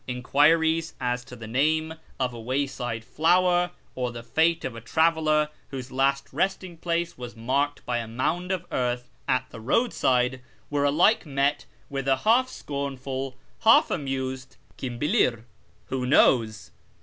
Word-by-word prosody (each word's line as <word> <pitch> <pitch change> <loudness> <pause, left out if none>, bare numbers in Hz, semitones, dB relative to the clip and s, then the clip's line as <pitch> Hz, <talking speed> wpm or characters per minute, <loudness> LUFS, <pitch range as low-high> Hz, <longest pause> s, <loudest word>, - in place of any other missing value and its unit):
Enquiries 160 +6 +2
as 125 -1 -1
to 125 - -11
the 115 -2 -9
name 155 +7 +1 0.3
of 125 -2 0
a 115 - -8
wayside 125 -2 -2
flower, 175 +4 +3 0.2
or 125 -1 -2
the 120 -1 -8
fate 160 +8 +1
of 120 - -4
a 115 - -8
traveller 155 +2 +2 0.2
whose 130 -1 -7
last 140 +1 +1
resting 185 +2 -1
place 170 -2 -2
was 120 -1 -7
marked 135 +5 -1
by 120 -1 -1
a 115 - -5
mound 155 +11 -1
of 180 -2 -2
earth 125 -1 -2 0.2
at 130 - +1
the 115 - -9
roadside, 130 - +1 0.3
were 145 -1 +1
alike 170 +10 +4
met 140 0 0 0.2
with 135 -1 -4
a 135 -1 +4
half 250 +4 +4
scornful, 135 - -5 0.2
half 225 +1 +5
amused 130 -2 -3
" - - -31
1dm 125 -3 -5
hilir? 120 -5 +2 0.2
" - - -35
(" 105 0 -36
who 130 -1 -2
knows 115 -5 +3
135 Hz, 160 wpm, -26 LUFS, 125-160 Hz, 0.3 s, half